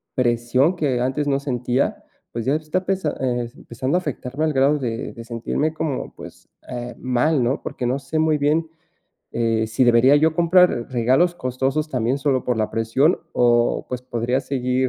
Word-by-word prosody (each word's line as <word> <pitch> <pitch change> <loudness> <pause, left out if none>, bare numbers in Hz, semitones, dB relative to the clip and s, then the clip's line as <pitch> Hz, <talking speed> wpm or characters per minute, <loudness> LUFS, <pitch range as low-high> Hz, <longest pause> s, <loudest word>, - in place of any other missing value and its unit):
presión 125 +6 +2
que 140 -7 0
antes 130 +4 -1
no 140 -1 +1
sentía. 125 -1 -1 0.3
Pues, 115 0 -4
ya 135 - +2
está 155 +4 -2
pesa 190 -5 -1
eh, 120 -2 -1
empezando 130 +7 -2
a - - +2
afectarme 145 0 -3
al 155 - 0
grado 135 +3 +3
de 115 -3 -3
de 115 - -9
sentirme, 125 +6 -2
como, 155 -4 -3
pues, - - -12 0.2
eh, 120 -1 -6
mal, 130 +2 +1
¿no?, 130 +5 0
porque 125 - -5
no 130 +3 0
sé 140 +4 -3
muy 155 -1 +2
bien, 155 +3 +1 0.6
eh, 115 -1 0
si 110 +4 0
debería 120 +3 +5
yo 160 +1 +3
comprar 180 +2 +5 0.2
regalos 130 +9 +2
costosos 135 +2 -1
también 125 0 0
solo 135 -2 0
por 125 -3 0
la 110 - 0
presión 120 +9 +2
o, 120 -1 +2
pues, 125 -1 -4
podría 125 +1 -1
seguir 130 -1 -1
130 Hz, 175 wpm, -22 LUFS, 120-150 Hz, 0.6 s, debería